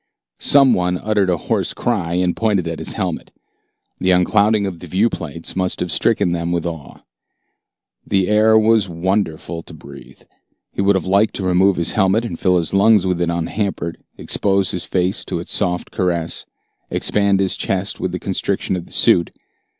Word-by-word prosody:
Some 140 -2 +5
one 90 0 0
uttered 105 -1 0
a 90 - +1
hoarse - - -2
cry 95 -8 -1
and 90 -1 0
pointed 105 -6 0
at 85 -1 -4
his - - -3
helmet. - - -4 0.7
The 95 - 0
unclouding 100 +3 +3
of 90 -4 -5
the 90 - -10
viewplates 85 -4 -2
must 95 -1 -1
have 90 - -3
stricken 85 - +1
them 85 0 -2
with 85 -1 -1
awe. 80 -5 -7 1.1
The 95 -2 +1
air 110 +1 +4
was 110 -2 +3
wonderful 85 -2 -2
to 85 - -13
breathe. 70 -2 -14 0.5
He - - -2
would 100 0 +3
have 95 - -1
liked 100 +3 +2
to 100 - -3
remove 95 +1 +3
his 85 -1 -1
helmet 105 +3 +2
and 85 -8 -6
fill 90 -1 +2
his 85 -3 -2
lungs 100 0 +4
with 90 -2 -1
it 85 - +1
unhampered, 85 0 -3 0.2
expose 100 -2 0
his 90 - -4
face 90 0 -1
to - - -3
its - - -4
soft 90 0 -1
caress, 85 -3 -2 0.4
expand 100 -1 +1
his 95 -2 0
chest 95 +1 -2
with 95 - -2
the 90 - -3
constriction 95 0 -2
of 90 -2 -6
the - - -8
suit. 85 - +4
95 Hz, 180 wpm, -19 LUFS, 85-100 Hz, 1.1 s, Some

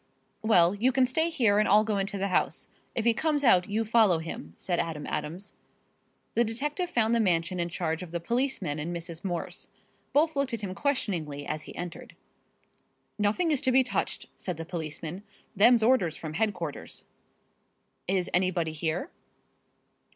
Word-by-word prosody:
"Well, 185 -6 +5
you 230 +6 +2
can 260 0 +4
stay 320 +6 +1
here 225 -10 +3
and 215 - +2
I'll 210 +2 +6
go 215 -2 0
into 195 +1 -2
the 195 +1 -1
house. - - 0 0.3
If 230 - 0
he 235 - +5
comes 295 +3 0
out 185 -8 +5
you 220 +2 0
follow 220 -5 +4
him," 160 - -7
said 175 -2 -1
Adam 155 -3 -3
Adams. 180 +7 -4 0.8
The 235 - +3
detective 295 - -2
found 230 -7 +2
the 235 - +3
mansion 180 -3 +1
in 170 0 -1
charge 165 -1 -2
of 180 - -7
the 170 - -2
policeman 210 - -1
and 170 +4 -3
Mrs. 170 -1 -5
Morse. 175 -3 -3 0.4
Both 315 +2 +3
looked 275 -3 0
at 220 - -7
him 195 -3 -4
questioningly 170 - -1
as 155 0 -3
he - - -10
entered. 175 -1 -7 1.0
"Nothing 215 - +2
is 290 - +2
to 260 - +2
be 260 +1 +5
touched," 250 - -2
said 180 -4 -4
the 165 - -5
policeman. 160 +1 -5 0.3
"Them's 225 +3 +6
orders 220 -10 +3
from 155 -2 -6
headquarters." 180 -6 -3 1.0
"Is 185 -1 +1
anybody 180 -3 +2
here?" 160 - -2
195 Hz, 170 wpm, -28 LUFS, 170-235 Hz, 1.0 s, I'll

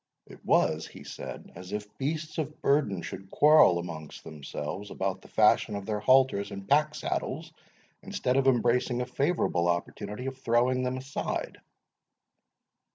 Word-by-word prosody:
"It - - -15
was," 80 0 +2
he - - -12
said, - - -8
"as 90 +2 -10
if 105 0 -5
beasts 155 +3 -3
of 155 0 -4
burden 135 - +1
should 95 0 -8
quarrel 150 - +6
amongst 80 -3 -7
themselves 75 +5 -6
about 95 -1 -3
the - - -15
fashion 105 - +3
of 100 -1 -5
their 105 0 -2
halters 130 -3 +3
and 100 0 -8
pack 150 +2 +3
saddles, - - -3 0.5
instead 125 - -1
of 135 0 +3
embracing 125 0 +2
a - - -1
favourable 125 - 0
opportunity 100 +6 -3
of 135 0 -5
throwing 125 +1 +2
them 125 0 -1
aside." 135 +2 -4
120 Hz, 150 wpm, -28 LUFS, 95-135 Hz, 0.5 s, quarrel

